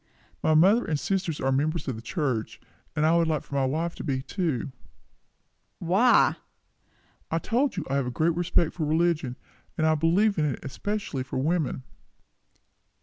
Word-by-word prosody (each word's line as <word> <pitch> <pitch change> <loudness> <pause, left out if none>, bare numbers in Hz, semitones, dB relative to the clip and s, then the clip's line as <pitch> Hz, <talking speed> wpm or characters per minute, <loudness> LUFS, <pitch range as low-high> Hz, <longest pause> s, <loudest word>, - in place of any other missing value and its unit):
"My 155 - +3
mother 200 +9 +5
and 150 -2 -1
sister 190 -1 -1
are 135 - +2
members 155 +5 0
of 130 - -2
the 110 - -8
church; 125 -3 -2 0.4
and 155 0 +2
I 160 +2 +4
should 165 - +2
like 155 -3 -2
my 140 -1 +1
wife 160 +6 -1
to - - -8
be, 130 -3 -2
too." 155 - -2 1.1
"Why?" 195 +9 +4 0.9
"I 165 - 0
told 240 +7 0
you, 165 - -2
I 135 - 0
have 135 -3 -1
a - - -1
great 160 +7 +1
respect 175 -1 +1
for 165 - -3
religion; 155 -4 +1 0.4
and 160 - +1
I 160 - +4
believe 175 +6 +2
in 155 - +2
it 140 - -3
especially 200 +1 -3
for 130 - -5
women." 150 -1 0
160 Hz, 170 wpm, -26 LUFS, 140-175 Hz, 1.1 s, mother